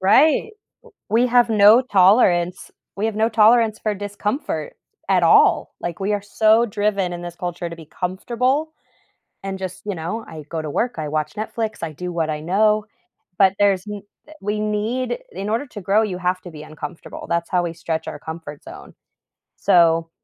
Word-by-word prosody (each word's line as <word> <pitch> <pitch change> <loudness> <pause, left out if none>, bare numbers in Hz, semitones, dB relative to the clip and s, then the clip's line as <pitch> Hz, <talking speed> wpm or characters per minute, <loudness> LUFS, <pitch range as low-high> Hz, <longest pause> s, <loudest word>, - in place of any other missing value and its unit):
Right. 290 - +4 0.4
W 470 - -24 0.2
We 235 +4 +3
have 240 -1 +4
no 215 +3 +7
tolerance. 185 -4 +3 0.3
We 210 +3 0
have 220 - -3
no 220 +1 +2
tolerance 220 0 +4
for 215 -1 0
discomfort 205 - -4 0.3
at - - +3
all. - - +4
Like, 175 0 -5
we 200 +2 0
are 205 - -1
so 220 +3 +3
driven 200 -3 -1
in 175 - -6
this 175 0 -7
culture 175 -1 -4
to 170 - -8
be 160 - -12
comfortable 250 - -1 0.7
and 195 0 -4
just 185 -1 -6
you 205 -3 -3
know, 175 +8 -4
I 155 -2 -9
go 165 -1 -3
to 155 - -5
work, 240 +11 -1
I 155 - -3
watch 155 0 -2
Netflix, 220 +1 -4
I 165 - -3
do 180 +4 -5
what 165 -2 -1
I 150 0 -3
know. 210 +5 +2 0.5
But 190 -1 +5
there's 195 -2 +2
n 205 -1 -6 0.4
we 210 +2 -2
need 220 - -1
in 200 +2 -5
order 230 +6 -1
to 205 -4 -9
grow, 200 +4 +2
you 195 -4 -3
have 180 0 0
to 175 - -10
be 150 - -10
uncomfortable, 155 +2 -8
that's 170 0 -1
how 180 -1 +1
we 170 -1 -3
stretch 160 -1 -4
our - - -6
comfort 160 -2 -8
zone. - - -12 0.6
So, 165 -1 +3
195 Hz, 185 wpm, -21 LUFS, 170-220 Hz, 0.7 s, no